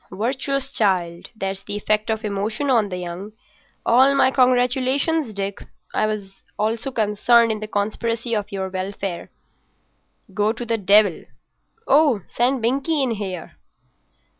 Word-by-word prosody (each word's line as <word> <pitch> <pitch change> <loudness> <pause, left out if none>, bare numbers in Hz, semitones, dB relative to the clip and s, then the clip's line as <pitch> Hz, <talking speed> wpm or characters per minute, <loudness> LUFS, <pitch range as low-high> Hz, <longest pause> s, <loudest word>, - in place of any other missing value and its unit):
"Virtuous 270 +5 -2
child. 180 -5 0
That's 195 -2 -3
the 205 - -4
effect 215 +1 0
of 220 0 -2
emotion 215 +7 -2
on 220 -5 +3
the 180 - -4
young. 180 +4 -7 0.5
All 265 +4 +5
my 270 -1 +4
congratulations, 255 +3 +2
Dick. 200 -1 -4 0.3
I - - +1 0.5
also 225 +5 -1
was 265 - -14
concerned 230 +2 +3
in 215 - -3
the 215 - -6
conspiracy 230 +3 -2
for 210 -2 +1
your 190 -2 -4
welfare." 190 -1 -5 1.0
"Go 210 +1 +1
to 240 +1 -6
the 230 -1 -1
devil—oh, 215 - +2
send 245 0 0
Binkie 275 +5 +1
in 255 - 0
here." 195 -5 -5
220 Hz, 135 wpm, -22 LUFS, 200-255 Hz, 1.0 s, All